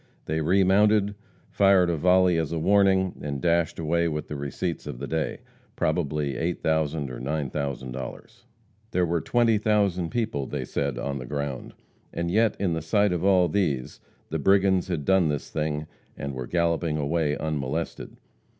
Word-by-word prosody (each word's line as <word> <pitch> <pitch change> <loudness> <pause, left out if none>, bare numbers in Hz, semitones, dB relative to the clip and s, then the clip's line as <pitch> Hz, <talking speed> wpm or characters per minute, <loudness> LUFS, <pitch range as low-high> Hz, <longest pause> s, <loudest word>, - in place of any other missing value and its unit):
They 80 +1 -1
remounted, 100 +4 +3 0.4
fired 95 -3 +4
a - - 0
volley 90 +1 +4
as 80 -2 -2
a 85 - -1
warning, 95 +1 +3
and 70 -2 -3
dashed 85 0 +1
away 85 +1 +1
with 75 -2 -4
the 75 - -4
receipts 70 +4 -4
of 70 -4 -5
the 70 - -5
day, 80 +1 -2 0.3
probably 75 -3 -1
$8,000 80 -2 -1
or - - -7
$9,000. 65 -2 -4 0.5
There 90 -5 +1
were 85 -1 0
twenty 115 -3 +2
thousand 100 -5 +1
people, 110 - -2
they - - -4
said, 70 -3 -2
on 70 +2 -3
the 65 - -7
ground. 70 -2 -4 0.4
And 85 0 -2
yet 110 +2 +3
in 95 -4 0
the 80 - -2
sight 100 +4 +2
of 90 0 -2
all 95 -2 +4
these 75 -8 -1 0.3
the - - -2
brigands 95 -1 +3
had 85 -6 -3
done 95 -4 +3
this 75 -2 -3
thing, 75 -1 -2 0.3
and 70 0 -4
were 65 -1 -5
galloping 85 -2 0
away 75 0 0
unmolested. 80 +1 -3
80 Hz, 160 wpm, -26 LUFS, 75-95 Hz, 0.5 s, fired